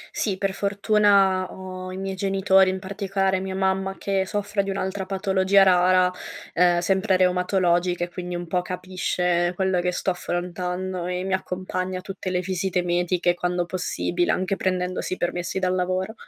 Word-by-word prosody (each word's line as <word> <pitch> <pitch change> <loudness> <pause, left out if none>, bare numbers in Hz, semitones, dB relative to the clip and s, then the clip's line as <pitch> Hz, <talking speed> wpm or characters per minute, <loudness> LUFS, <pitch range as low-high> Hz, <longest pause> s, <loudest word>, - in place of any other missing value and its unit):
Sì, 195 -4 -1
per 195 0 -1
fortuna 200 -2 +2
ho 185 0 -7
i 185 - -6
miei 195 0 -4
genitori, 195 0 +3
in 190 - -1
particolare 195 0 -1
mia 190 0 -4
mamma, 190 0 0
che 195 -1 -1
soffre 205 0 -1
di 195 - -4
un'altra 190 0 -3
patologia 195 0 +3
rara, 185 0 +4 0.4
ehm, 175 0 +4
sempre 190 +2 +2
reumatologica, 180 -1 +2
e 175 - -3
quindi 180 0 -5
un 175 - -4
po' 180 +1 0
capisce 180 -1 -1
quello 190 -1 +1
che 180 0 0
sto 185 +1 -1
affrontando 180 +1 -3
e 180 0 -2
mi 190 - -2
accompagna 185 0 -3
a - - -6
tutte 195 0 -6
le 180 -1 0
visite 185 0 -1
mediche 175 0 +1
quando 175 0 -1
possibile, 175 0 -1
anche 185 +1 0
prendendosi 185 -1 -2
permessi 175 +1 -2
dal 185 -1 +1
lavoro. 185 +3 -1
185 Hz, 160 wpm, -24 LUFS, 180-190 Hz, 0.4 s, rara